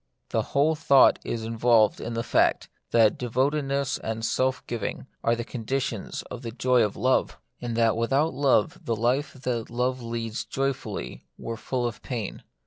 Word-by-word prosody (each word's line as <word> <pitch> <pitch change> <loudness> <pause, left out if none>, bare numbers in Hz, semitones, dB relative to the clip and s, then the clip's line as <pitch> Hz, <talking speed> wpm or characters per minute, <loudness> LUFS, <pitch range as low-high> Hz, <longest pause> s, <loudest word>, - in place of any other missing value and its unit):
The - - +1 0.2
whole 150 +3 +4
thought 140 -4 +5
is 115 -1 -3
involved 115 -1 +3
in 115 - -4
the 115 - -1
fact, - - +2 0.2
that 115 -2 +4
devotedness 135 +2 0
and 110 0 -3
self 130 +1 0
giving 115 -3 -4 0.2
are 115 - +3
the 120 - -4
con 120 0 -7
ditions 125 -3 -2
of - - -6
the 115 - -5
joy 125 +1 +2
of 105 -3 +1
love; 130 +4 +1 0.2
and 120 -1 -3
that 115 -2 +3
without 135 +7 +1
love 130 -5 +2
the 115 - -1
life 125 +6 0
that 125 -4 -3
love 125 +2 -1
leads 115 -1 -4
joyfully 135 - -4
were 115 - -5
full 125 +2 -2
of 120 -2 -4
pain. 115 -6 -5
120 Hz, 170 wpm, -26 LUFS, 115-130 Hz, 0.2 s, thought